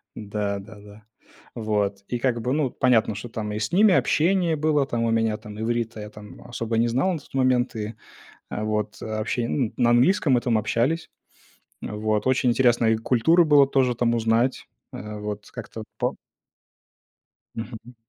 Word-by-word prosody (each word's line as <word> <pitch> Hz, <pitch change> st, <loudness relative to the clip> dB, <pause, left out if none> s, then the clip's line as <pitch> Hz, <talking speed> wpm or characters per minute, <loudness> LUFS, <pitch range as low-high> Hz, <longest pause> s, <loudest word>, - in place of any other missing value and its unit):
Да, 100 Hz, -1 st, -3 dB
да, 110 Hz, +3 st, -12 dB
да. 105 Hz, +1 st, -15 dB, 0.5 s
Вот, 105 Hz, -3 st, -1 dB
и 120 Hz, -, -3 dB
как 120 Hz, -2 st, 0 dB
бы, 125 Hz, +4 st, -1 dB
ну, 150 Hz, -3 st, +1 dB
понятно, 115 Hz, -5 st, +2 dB
что, 110 Hz, +3 st, -6 dB
там, 110 Hz, -2 st, -4 dB
и 105 Hz, -, -3 dB
с 105 Hz, -, -2 dB
ними 200 Hz, +1 st, +5 dB
общение 170 Hz, 0 st, +2 dB
было, 150 Hz, -2 st, +1 dB
там, 120 Hz, -3 st, -2 dB
у 115 Hz, -, +1 dB
меня, 115 Hz, -1 st, +1 dB
там, 105 Hz, 0 st, -10 dB
иврита 115 Hz, 0 st, -2 dB
я, 105 Hz, -, -7 dB
там, 105 Hz, -1 st, -13 dB
особо 115 Hz, -1 st, -3 dB
не 115 Hz, +1 st, +3 dB
знал 130 Hz, +11 st, +1 dB
на 165 Hz, -, -3 dB
тот -, -, -20 dB
момент, 130 Hz, -2 st, +1 dB
и, 110 Hz, 0 st, -5 dB, 0.6 s
э, 105 Hz, -, -4 dB
вот, 105 Hz, -1 st, -2 dB
э, -, -, -6 dB
обще 110 Hz, +2 st, -2 dB
ну, 125 Hz, -7 st, -1 dB
на 120 Hz, -1 st, +3 dB
английском 135 Hz, +3 st, +4 dB
мы 120 Hz, -, +3 dB
там 120 Hz, -3 st, +1 dB
общались. 125 Hz, +10 st, 0 dB, 0.7 s
Вот, 105 Hz, +1 st, -1 dB
очень 130 Hz, -1 st, +2 dB
интересно 120 Hz, -1 st, +3 dB
их 110 Hz, 0 st, +2 dB
культуру 160 Hz, +9 st, +4 dB
было 145 Hz, -2 st, +6 dB
тоже, 130 Hz, -3 st, +1 dB
там, 120 Hz, 0 st, +1 dB
узнать, 115 Hz, +3 st, +1 dB, 0.3 s
э, 105 Hz, +1 st, -7 dB
вот, 105 Hz, 0 st, -6 dB
как-то 115 Hz, -2 st, -8 dB, 0.2 s
по -, -, 0 dB, 1.4 s
Мгм. 115 Hz, +1 st, -8 dB
115 Hz, 180 wpm, -24 LUFS, 110-130 Hz, 1.4 s, было